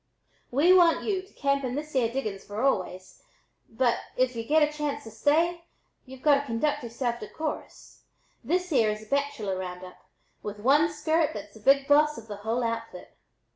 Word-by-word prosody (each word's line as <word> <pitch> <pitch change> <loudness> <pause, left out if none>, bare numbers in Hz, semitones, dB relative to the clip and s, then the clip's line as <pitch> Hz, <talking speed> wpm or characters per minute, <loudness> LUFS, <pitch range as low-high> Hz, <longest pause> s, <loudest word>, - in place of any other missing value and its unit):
We 300 +9 +5
want 350 -3 +5
y'u 390 -3 -1
to 385 - -20
camp 280 -1 0
in 255 -1 -2
this 300 +1 -5
yere 240 -4 +1
diggins 215 -7 -4
for 205 +1 -7
always, 185 -8 -1 0.5
but, 240 +1 +1 0.2
if 255 -1 +1
y'u 230 - -3
get 305 +6 +3
a 300 - -8
chance 295 -1 -3
to 225 - -10
stay, 330 +9 +1 0.4
y'u've 260 0 -12
got 290 -2 +5
to 285 - -6
conduct 260 +5 0
yereself 235 0 -3
decorus. 305 +8 -7 0.4
This 360 +7 -1
yere 235 -7 +3
is 215 0 -6
a - - -13
bachelor 220 -7 -1
round 180 -1 -6
up 180 - -11 0.4
with 210 0 -6
one 290 +8 +4
skirt 315 +1 0
that's 205 - -8
the 220 - -14
big 275 +5 +4
boss 300 +1 +4
of 225 - -10
the 205 -2 -6
whole 225 +4 -2
outfit. 230 -5 -5
260 Hz, 190 wpm, -27 LUFS, 220-300 Hz, 0.5 s, We